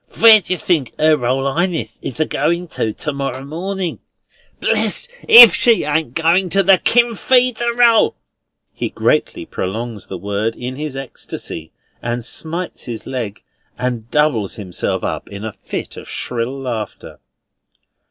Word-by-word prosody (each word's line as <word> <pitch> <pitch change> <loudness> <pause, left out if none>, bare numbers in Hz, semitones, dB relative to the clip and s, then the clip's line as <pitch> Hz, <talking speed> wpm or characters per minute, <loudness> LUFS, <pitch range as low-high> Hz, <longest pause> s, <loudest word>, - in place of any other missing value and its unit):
"Where 225 -1 +9
did 185 - -16
yer 185 - 0
think 170 - 0
"Er 155 0 +5
Royal 135 +1 -1
Highness 165 -10 -2
is 125 - -6
a 155 - +3
goin' 170 +6 -1
to 110 - -2
to 150 +7 -5
morrow 135 -1 -4
morning? 180 +4 -4 0.6
Blest - - 0 0.2
if 230 -5 +11
she 235 -2 +3
ain't 150 -3 -1
a - - -2
goin' 180 +3 +3
to 195 +3 +3
the 190 -1 +5
KIN 240 0 +3
FREE 250 +3 +3
DER 235 0 -3
EL!" 230 -2 +4 0.6
He - - -3
greatly - - 0
prolongs 110 +3 -5
the 95 - -6
word 100 +4 -2
in 125 +1 -6
his 150 -1 -5
ecstasy, 85 -10 -7 0.3
and 120 0 -3
smites 170 +7 -5
his 115 -3 -6
leg, 115 -6 -5 0.3
and 120 -2 -3
doubles 145 -10 +1
himself 95 -5 -3
up - - -4
in 100 +1 -7
a 110 - -5
fit - - -7
of - - -10
shrill 125 +3 -3
laughter. 115 -6 -6
140 Hz, 160 wpm, -18 LUFS, 115-180 Hz, 0.6 s, if